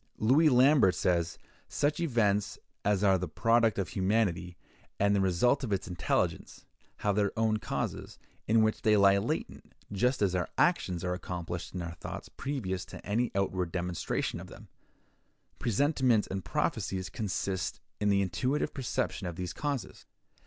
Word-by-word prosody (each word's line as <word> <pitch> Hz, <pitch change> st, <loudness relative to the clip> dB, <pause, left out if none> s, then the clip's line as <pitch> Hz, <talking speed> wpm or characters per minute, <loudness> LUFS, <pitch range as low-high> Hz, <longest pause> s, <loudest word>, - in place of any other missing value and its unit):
Louis 140 Hz, +9 st, +4 dB
Lambert 130 Hz, -6 st, +5 dB
says: 85 Hz, -2 st, 0 dB, 0.3 s
"Such 145 Hz, +4 st, 0 dB
events 110 Hz, -10 st, +1 dB, 0.3 s
as 105 Hz, -1 st, +1 dB
are 95 Hz, -2 st, +4 dB
the 90 Hz, -, -3 dB
product 115 Hz, +6 st, +2 dB
of 95 Hz, -6 st, -1 dB
humanity, 95 Hz, -2 st, 0 dB, 0.4 s
and 100 Hz, 0 st, +3 dB
the 100 Hz, -, +2 dB
result 95 Hz, +9 st, +2 dB
of 120 Hz, -, -3 dB
its 100 Hz, +1 st, -1 dB
intelligence, 90 Hz, -4 st, -2 dB, 0.4 s
have 100 Hz, -1 st, +2 dB
their 100 Hz, -1 st, +2 dB
own 110 Hz, -1 st, +2 dB
causes, -, -, -4 dB, 0.3 s
in 110 Hz, 0 st, +4 dB
which 110 Hz, 0 st, 0 dB
they 110 Hz, -2 st, +4 dB
lie 100 Hz, 0 st, +5 dB
latent, -, -, -4 dB, 0.2 s
just 125 Hz, +3 st, +1 dB
as 95 Hz, -3 st, +2 dB
our 90 Hz, -2 st, -1 dB
actions 90 Hz, -2 st, +1 dB
are 90 Hz, 0 st, -1 dB
accomplished 90 Hz, -1 st, -5 dB
in 90 Hz, -, -3 dB
our 85 Hz, 0 st, -5 dB
thoughts -, -, -8 dB
previous 100 Hz, -10 st, -3 dB
to -, -, -11 dB
any 115 Hz, +4 st, 0 dB
outward 95 Hz, -3 st, -1 dB
demonstration 90 Hz, -1 st, -2 dB
of -, -, -9 dB
them; -, -, -13 dB, 0.9 s
presentiments 125 Hz, -1 st, +2 dB
and 95 Hz, 0 st, -3 dB
prophecies 110 Hz, -, -1 dB
consist 95 Hz, -1 st, -3 dB, 0.2 s
in 105 Hz, -, +1 dB
the 100 Hz, -1 st, +3 dB
intuitive 125 Hz, -, -1 dB
perception 120 Hz, -7 st, -2 dB
of 85 Hz, -, -5 dB
these 90 Hz, 0 st, -4 dB
causes." 145 Hz, -5 st, -4 dB
100 Hz, 155 wpm, -30 LUFS, 90-115 Hz, 0.9 s, Lambert